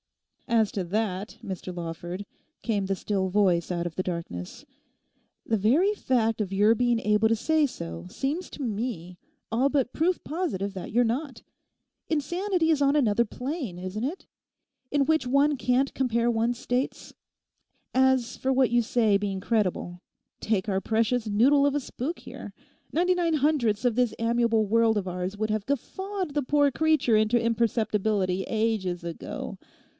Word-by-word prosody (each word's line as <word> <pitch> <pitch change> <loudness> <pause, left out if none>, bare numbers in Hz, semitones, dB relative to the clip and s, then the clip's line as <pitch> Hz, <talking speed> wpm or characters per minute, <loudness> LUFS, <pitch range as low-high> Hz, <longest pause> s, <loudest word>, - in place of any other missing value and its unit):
'As 225 -4 +2
to 195 - -1
that, 200 +1 -2
Mr 185 -1 -5
Lawford,' 175 +3 -6 0.4
came 205 -4 0
the 195 - 0
still 190 -1 -1
voice 185 -4 +2
out 175 -1 -2
of 170 -2 -5
the 185 - -1
darkness; 165 - -6 0.8
'the 225 - +1
very 285 - +3
fact 225 - 0
of 195 -2 -3
your 205 +3 +4
being 240 0 +2
able 210 0 +2
to 225 - +3
say 315 +5 +2
so 85 - -7
seems 295 - -3
to 290 - -7
me 205 -6 -4 0.3
all 250 +5 +2
but 270 -4 0
proof 350 +3 +1
positive 275 - -2
that 185 - -7
you're 240 +3 +4
not. 255 +1 -3 0.7
Insanity 345 +3 0
is 310 -3 +2
on 280 +1 +3
another 235 -4 +3
plane, 250 - -5
isn't 185 +5 -5
it? 310 +9 -4 0.6
in 280 -1 +2
which 315 -3 +2
one 280 +3 +3
can't 255 +2 +1
compare 235 -2 +1
one's 235 +1 0
states. 250 +2 -3 0.8
As 260 -2 +3
for 265 - -1
what 260 -2 +3
you 240 0 +4
say 220 -3 +2
being 200 -1 -3
credible, 185 -4 -1 0.4
take 210 -2 0
our 190 -2 0
precious 225 +2 0
noodle 270 +7 +4
of 285 0 +2
a - - +2
spook 285 +4 -5
here! - - -9 0.4
Ninety 360 +3 +2
nine 340 -3 +1
hundredths 260 -7 +1
of 240 -3 +2
this 250 -1 +1
amiable 230 -1 +2
world 225 +1 +3
of 195 -2 -2
ours 180 +2 -4
would 215 +1 -1
have 215 -1 -2
guffawed 375 - -3
the 295 - +1
poor 285 +1 +3
creature 310 -5 +2
into 215 +2 +3
imperceptibility 215 -4 0
ages 215 -6 -1
ago. 170 -1 -6
230 Hz, 160 wpm, -27 LUFS, 200-275 Hz, 0.8 s, your